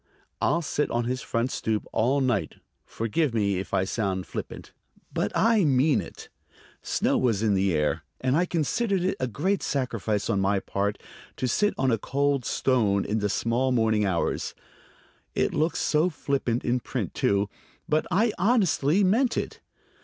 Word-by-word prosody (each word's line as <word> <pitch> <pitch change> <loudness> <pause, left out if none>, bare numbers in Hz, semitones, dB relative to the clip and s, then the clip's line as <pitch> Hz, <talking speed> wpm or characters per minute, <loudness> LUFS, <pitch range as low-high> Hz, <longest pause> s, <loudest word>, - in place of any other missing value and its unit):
"I'll 170 - +2
sit 150 0 -1
on 120 0 0
his 125 +2 -2
front 115 +3 -1
stoop 110 -1 -2
all 130 +5 +2
night.... 125 -6 0 0.3
Forgive 115 +4 -1
me 100 -4 +1
if 95 - -6
I 95 - +2
sound 95 -2 -2
flippant; - - -7 0.4
but - - -1
I 225 -3 +4
mean 140 0 +3
it." - - -11 0.5
Snow - - +1
was 115 -4 +1
in 105 -2 +3
the 95 0 +2
air, 75 -1 0 0.2
and 130 +1 +1
I 175 +3 +2
considered 185 - 0
it 190 - 0
a 130 - 0
great 180 - -1
sacrifice 115 -6 -1
on 100 - +1
my 100 +1 +2
part 100 +2 -2 0.4
to 130 - -1
sit 205 - +1
on 130 -1 +2
a 115 - +1
cold 140 +1 0
stone 105 -7 +1
in 110 +2 -1
the 105 0 0
small 120 +5 0
morning 110 -3 +2
hours. 95 -4 -1 0.8
It - - +1
looks 160 +2 0 0.2
flippant 140 -6 -2
in 125 +1 +1
print, - - -4
too, 100 0 +1 0.4
but 155 +1 +1
I 210 +5 +2
honestly 190 - +3
meant 230 +6 +2
it. - - -3
125 Hz, 165 wpm, -26 LUFS, 105-155 Hz, 0.8 s, I